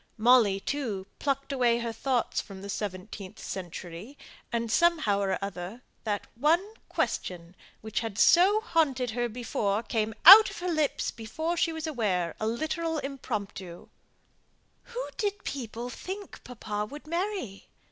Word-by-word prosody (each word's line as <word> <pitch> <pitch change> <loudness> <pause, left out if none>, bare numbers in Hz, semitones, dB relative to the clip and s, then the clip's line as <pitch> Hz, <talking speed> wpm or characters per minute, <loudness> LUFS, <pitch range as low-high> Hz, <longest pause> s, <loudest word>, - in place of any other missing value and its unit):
Molly, 225 -4 +5
too, 220 -6 -3
plucked 275 0 -1
away 245 -3 +3
her 235 -1 -3
thoughts 250 +1 0
from 195 -1 -11
the 200 - -5
seventeenth 195 -1 -6
century; 180 - -7 0.3
and, 230 -1 -1
somehow 310 -11 +3
or 195 -2 0
other, 200 +5 -7 0.2
that 205 -2 -1
one 330 - +2 0.2
question, 175 0 -3 0.3
which 220 -1 -2
had 225 -3 -5
so 380 - +6
haunted 270 - +1
her 240 +1 -1
before, 220 -2 -1
came 220 -2 -1
out 400 +6 +12
of - - -9
her 355 0 -2
lips 310 -3 0
before 315 +10 -3
she 335 -1 +1
was 320 0 -5
aware 205 - -1
a 215 - -1
literal 315 +7 -1
impromptu, 205 - -5 1.0
"Who - - -5
did 410 -1 -2
people 245 -2 -5
think 390 +6 -8
papa 210 -4 -4
would 295 +1 -10
marry? 340 - -3
235 Hz, 140 wpm, -28 LUFS, 205-315 Hz, 1.0 s, out